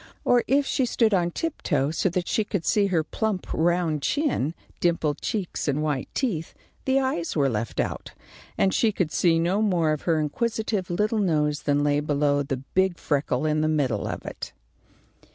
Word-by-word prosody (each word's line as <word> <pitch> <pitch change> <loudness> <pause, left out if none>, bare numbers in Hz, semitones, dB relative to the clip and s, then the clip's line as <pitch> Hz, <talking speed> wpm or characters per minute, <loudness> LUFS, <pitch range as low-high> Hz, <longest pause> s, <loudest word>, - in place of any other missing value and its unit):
Or 245 -1 +4
if 280 +2 +3
she 260 -1 0
stood 225 -2 +2
on 175 -2 +2
tiptoe 160 - -1
so 190 - +1
that 180 0 -2
she 220 - +1
could 200 -5 -3
see 205 -2 +3
her 170 -5 +1
plump 210 +2 -2
round 170 -2 +1
chin, 245 - 0 0.2
dimpled 165 -4 0
cheeks, 200 -7 -3
and 145 +1 0
white 145 -4 -1
teeth, 175 - -2 0.3
the 265 0 +3
eyes 260 -11 -1
were 140 -3 +3
left 110 -1 -3
out, - - -3 0.4
and 190 - +2
she 225 - +3
could 180 -6 -1
see 165 -2 +3
no 175 +5 +1
more 175 -7 +2
of 155 - -1
her 160 -1 +3
inquisitive 215 +4 -1
little 210 +5 0
nose 150 -6 +1
than 145 -1 +1
lay 145 0 +2
below 145 -1 +1
the 135 -1 -2
big 180 +7 0
freckle 145 +1 0
in 155 0 +1
the 155 - +2
middle 140 -9 0
of - - -5
it. - - -7
170 Hz, 185 wpm, -25 LUFS, 150-210 Hz, 0.4 s, Or